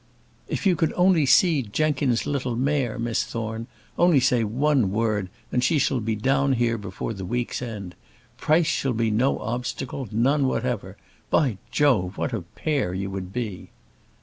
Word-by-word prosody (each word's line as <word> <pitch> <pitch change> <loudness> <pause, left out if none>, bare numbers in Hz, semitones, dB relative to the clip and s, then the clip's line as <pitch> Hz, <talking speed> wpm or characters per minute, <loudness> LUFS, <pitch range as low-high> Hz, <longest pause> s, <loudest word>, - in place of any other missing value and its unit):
"If - - -3
you 185 -2 +4
could 160 0 0
only 180 -5 +3
see 150 +2 +5
Jenkins's 135 +1 0
little 130 -4 -2
mare, 130 -2 0
Miss 115 -1 0
Thorne! 115 0 -5 0.3
Only 175 -5 +5
say 125 -2 +2
one 130 +1 +2
word, 105 -3 0 0.2
and 125 - +1
she 155 +5 +3
shall 135 -2 +1
be 110 0 -1
down 135 +5 +2
here 115 -2 +1
before 100 +2 -5
the 95 -2 -7
week's 120 +6 -2
end. 105 -7 -6 0.4
Price 160 +2 +2
shall 135 -3 0
be 115 -1 0
no 120 +6 +2
obstacle 125 +2 -4
none 135 +6 +2
whatever. 110 -7 -2 0.3
By 125 - +2
Jove, 105 -11 +2
what - - -2
a - - -2
pair 135 -13 -2
you 95 +1 -3
would 95 -1 -5
be!" 110 -5 -5
125 Hz, 165 wpm, -24 LUFS, 110-140 Hz, 0.4 s, see